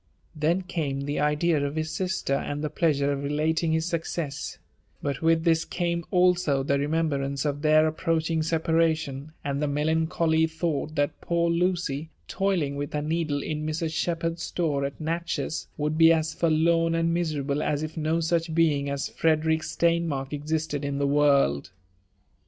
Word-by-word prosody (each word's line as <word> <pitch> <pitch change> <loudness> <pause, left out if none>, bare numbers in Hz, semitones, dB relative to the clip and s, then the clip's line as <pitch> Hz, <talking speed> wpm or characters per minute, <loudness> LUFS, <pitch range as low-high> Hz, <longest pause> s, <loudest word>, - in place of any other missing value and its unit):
Then 165 +5 +1
came 150 -7 -2
the 145 +1 -2
idea 150 +1 +2
of 140 +1 -2
his 155 0 -2
sister, 185 -4 -1
and 145 +2 -2
the 150 - -2
pleasure 145 -4 +1
of 140 - -1
relaliqg 155 +3 0
his 160 0 +1
success; 165 -3 -3 0.4
but 140 -2 -3
with 165 0 +3
ibis 165 -1 +3
eamo 170 -1 -2
also 180 -6 +3
the 140 +1 +1
remembrance 140 -2 -1
of 145 -1 -1
their 155 0 +5
ap 155 0 -4
proaching 165 -1 0
separation, 160 -3 0
ikod 140 -1 -1
the 150 - 0
melancholy 160 +2 +1
thought 160 -2 -2
that 145 -1 -1
poor 170 0 +1
Lucy, 170 -4 0 0.2
jtoiljai 185 -8 0
with 145 0 -4
her 150 -1 -1
needle 155 -2 -1
in 155 -1 -3
Mrs. 155 +1 -2
Shepherd's 165 0 -1
store 150 -6 -1
at 140 - -6
Natchez, 165 0 -3
woyuld 150 +1 -1
b^ 165 0 +7
^s 160 -1 +2
{orlorn 165 0 +3
and 165 0 +1
miserable 150 -4 -1
as 150 0 -1
if 155 - -5
no 160 0 0
sneb 165 -1 0
being 150 -4 +2
as 140 0 -2
Frederick 160 0 +1
Steinmark 165 -6 0
ojiated 150 0 -2
m 140 0 -2
the 140 - +1
world. 140 - +3
155 Hz, 165 wpm, -26 LUFS, 145-165 Hz, 0.4 s, b^